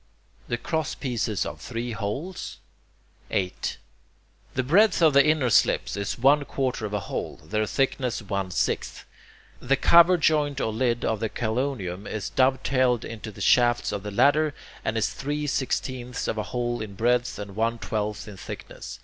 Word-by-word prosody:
the 120 Hz, -, -1 dB
crosspieces 125 Hz, -, -2 dB
of -, -, -7 dB
three 120 Hz, +1 st, -4 dB
holes? 115 Hz, -, -4 dB, 0.7 s
8. 90 Hz, -2 st, -2 dB, 0.8 s
The 130 Hz, -, +1 dB
breadth 190 Hz, -, +4 dB
of 160 Hz, -4 st, +5 dB
the 140 Hz, 0 st, +7 dB
inner 150 Hz, -5 st, +2 dB
slips -, -, +3 dB
is 100 Hz, -1 st, -3 dB
one 140 Hz, +4 st, +4 dB
quarter 130 Hz, -5 st, -2 dB
of 105 Hz, -, -9 dB
a 105 Hz, -, -1 dB
hole; 85 Hz, -, -5 dB
their 110 Hz, 0 st, -1 dB
thickness 130 Hz, -2 st, 0 dB
one 100 Hz, -3 st, -3 dB
sixth. 90 Hz, -, -2 dB, 0.5 s
The 135 Hz, +2 st, +2 dB
cover 170 Hz, +5 st, +6 dB
joint 145 Hz, -3 st, +2 dB
or 110 Hz, -, -1 dB
lid 120 Hz, +1 st, 0 dB
of 110 Hz, -, 0 dB
the 110 Hz, 0 st, -1 dB
chelonium 110 Hz, -6 st, -2 dB
is 110 Hz, -2 st, -4 dB
dove 130 Hz, 0 st, +2 dB
tailed 130 Hz, -3 st, +2 dB
into 110 Hz, -1 st, -7 dB
the 105 Hz, -, -11 dB
shafts 120 Hz, -1 st, +3 dB
of 100 Hz, -, -3 dB
the 105 Hz, -, -5 dB
ladder, 145 Hz, +8 st, +3 dB, 0.3 s
and 115 Hz, -, -1 dB
is 110 Hz, -, 0 dB
three 145 Hz, +2 st, -3 dB
sixteenths 130 Hz, -2 st, -2 dB
of 110 Hz, -, -1 dB
a -, -, -1 dB
hole 120 Hz, -1 st, -2 dB
in 105 Hz, -2 st, -6 dB
breadth 120 Hz, +3 st, +1 dB
and 100 Hz, -1 st, -7 dB
one 115 Hz, +2 st, 0 dB
twelfth 105 Hz, -1 st, -3 dB
in 105 Hz, -2 st, -9 dB
thickness. -, -, -8 dB
120 Hz, 165 wpm, -26 LUFS, 110-140 Hz, 0.8 s, the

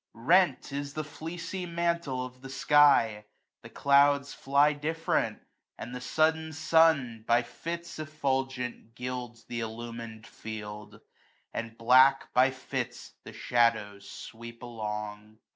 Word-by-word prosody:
35 115 Hz, +3 st, -13 dB
Rent 180 Hz, -4 st, +3 dB
is 140 Hz, 0 st, -4 dB
the 155 Hz, -, -2 dB
fleecy 165 Hz, +4 st, -6 dB
mantle 170 Hz, -6 st, -1 dB
of 125 Hz, 0 st, -12 dB
the 135 Hz, -, -9 dB
sky; 135 Hz, -6 st, +4 dB, 0.4 s
The -, -, -11 dB
clouds 140 Hz, 0 st, +3 dB
fly 140 Hz, +2 st, +3 dB
different; 160 Hz, +3 st, -1 dB, 0.3 s
and 120 Hz, -, -7 dB
the 125 Hz, -, -6 dB
sudden 160 Hz, +3 st, +1 dB
sun 145 Hz, -8 st, +3 dB
By 120 Hz, +1 st, +4 dB
fits 170 Hz, +6 st, -7 dB
effulgent 135 Hz, -6 st, -3 dB
gilds 125 Hz, -1 st, -6 dB
th' 120 Hz, 0 st, -5 dB
illumin 115 Hz, 0 st, -7 dB
d -, -, -13 dB
field, 105 Hz, -1 st, -8 dB, 0.5 s
And 115 Hz, 0 st, -5 dB
black 130 Hz, +3 st, +5 dB
by 130 Hz, +2 st, +5 dB
fits 130 Hz, 0 st, -5 dB
the -, -, -9 dB
shadows 110 Hz, -4 st, 0 dB
sweep 115 Hz, +1 st, -10 dB
along. 105 Hz, -2 st, -6 dB
130 Hz, 125 wpm, -29 LUFS, 115-150 Hz, 0.5 s, black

